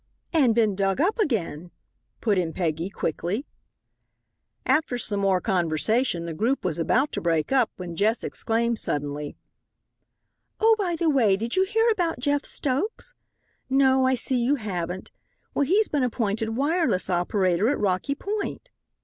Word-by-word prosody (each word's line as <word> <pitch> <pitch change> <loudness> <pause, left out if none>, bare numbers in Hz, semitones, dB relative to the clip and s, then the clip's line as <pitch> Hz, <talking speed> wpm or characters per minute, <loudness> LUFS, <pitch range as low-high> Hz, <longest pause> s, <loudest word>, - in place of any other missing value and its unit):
"And 265 -9 +4
been 220 -4 +2
dug 195 +3 0
up 390 +9 +1
again," 180 - -1 0.5
put 205 -4 +2
in 165 -3 -2
Peggy, 165 0 -2
quickly. 190 - -3 1.2
After 300 -5 +1
some 210 -4 -1
more 195 -2 +2
conversation 180 - +1
the 170 - -4
group 230 - -1
was 170 -3 -1
about 255 - +2
to - - -3
break 165 +1 0
up, 255 -4 +3
when 175 -2 -6
Jess 215 +5 +1
exclaimed 230 0 -1
suddenly: 145 0 -3 1.2
"Oh, 445 0 +5
by 360 -4 0
the 330 0 -1
way, 235 -10 +3
did 230 +3 -3
you 380 - +3
hear 450 +4 +1
about 350 -6 0
Jeff 285 +2 0
Stokes? 360 - -2 0.6
No, 265 0 +4
I 260 - +3
see 250 0 0
you 275 +4 +3
haven't. 185 -6 -5 0.4
Well, 285 - +1
he's 405 +8 +3
been 290 - -1
appointed 225 -2 -1
wireless 300 - +1
operator 185 +2 +1
at 290 - +1
Rocky 200 +8 0
Point." 425 +7 -4
230 Hz, 150 wpm, -25 LUFS, 185-285 Hz, 1.2 s, Oh